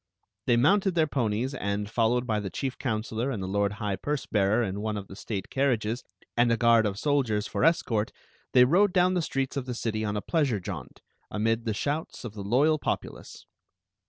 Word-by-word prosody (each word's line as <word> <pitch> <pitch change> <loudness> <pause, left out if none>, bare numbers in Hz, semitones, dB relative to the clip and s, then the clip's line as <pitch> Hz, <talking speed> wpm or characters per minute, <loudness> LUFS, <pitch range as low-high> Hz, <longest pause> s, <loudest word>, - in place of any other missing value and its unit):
They 120 - +4
mounted 190 +8 +3
their 160 -2 +4
ponies, 125 -2 -1
and, 100 -5 -2
followed 120 +3 +1
by 110 -3 0
the 100 -2 -4
chief 130 +8 -3
counselor 110 +1 -2
and 110 -8 -3
the - - -3
lord 100 +1 0
high 105 -2 -3
purse 145 -1 -2
bearer 105 +3 +2
in 100 -1 -3
one 105 0 -2
of 100 -1 -6
the 95 - -10
state 100 -1 -5
carriages, 120 -4 0 0.3
and 120 0 +3
a 115 - +3
guard 115 -2 +5
of 100 -1 -3
soldiers 125 -7 +1
for - - -2
escort, 115 -10 +2 0.4
they 125 -1 +7
rode 185 +8 +4
down 180 0 +4
the 180 - +1
streets 135 -3 -2
of 130 -2 -3
the 125 - -3
city 110 -2 -2
on 105 -1 -1
a - - -2
pleasure 145 - +1
jaunt, 90 - -8 0.3
amid 115 +2 0
the 110 -2 -1
shouts 145 +1 -3
of 110 - -6
the 105 - -7
loyal 145 +9 +3
populace. - - -5
115 Hz, 205 wpm, -27 LUFS, 105-140 Hz, 0.4 s, they